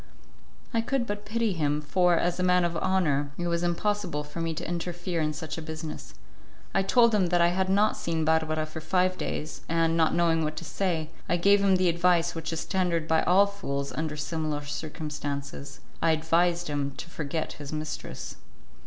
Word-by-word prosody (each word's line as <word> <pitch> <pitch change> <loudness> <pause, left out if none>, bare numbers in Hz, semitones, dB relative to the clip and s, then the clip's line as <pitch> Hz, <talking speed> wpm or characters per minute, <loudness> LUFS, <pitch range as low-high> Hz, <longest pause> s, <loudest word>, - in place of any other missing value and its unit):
I 230 - +3
could 250 +1 0
but 205 -1 -5
pity 225 -1 0
him, 150 -3 0
for, 175 +4 +3
as 175 +1 0
a - - +1
man 180 -1 +4
of 170 0 -2
honour, 155 -6 +1
it 175 - -2
was 170 0 0
impossible 175 -2 -1
for 150 +3 -6
me 165 -1 -1
to - - -4
interfere 175 0 -3
in 155 0 +1
such 155 +2 -5
a - - -6
business. 160 0 -7 0.6
I 195 - +3
told 235 +3 +4
him 195 -4 +3
that 175 0 +2
I 170 0 +5
had 185 +1 0
not 205 +3 +3
seen 165 -2 -1
Barbara 155 0 +1
for 155 +1 -8
five 185 +3 +2
days, 155 -3 -4
and, 165 0 +2
not 165 -1 +3
knowing 165 -1 +3
what 155 0 -2
to 170 - -6
say, 160 -1 -1 0.2
I 175 - +3
gave 200 +3 +4
him 195 -1 +5
the 185 0 +2
advice 170 0 +3
which 165 0 -4
is 165 - -3
tendered 175 -4 0
by 160 0 +3
all 190 +3 +6
fools 140 -9 -4
under 155 -1 -3
similar 150 -1 -2
circumstances; 145 -2 -5 0.2
I 165 - +4
advised 170 +2 +2
him 140 -2 -2
to - - -7
forget 155 -1 -3
his 145 -1 -8
mistress. 155 0 -5
165 Hz, 195 wpm, -27 LUFS, 155-180 Hz, 0.6 s, all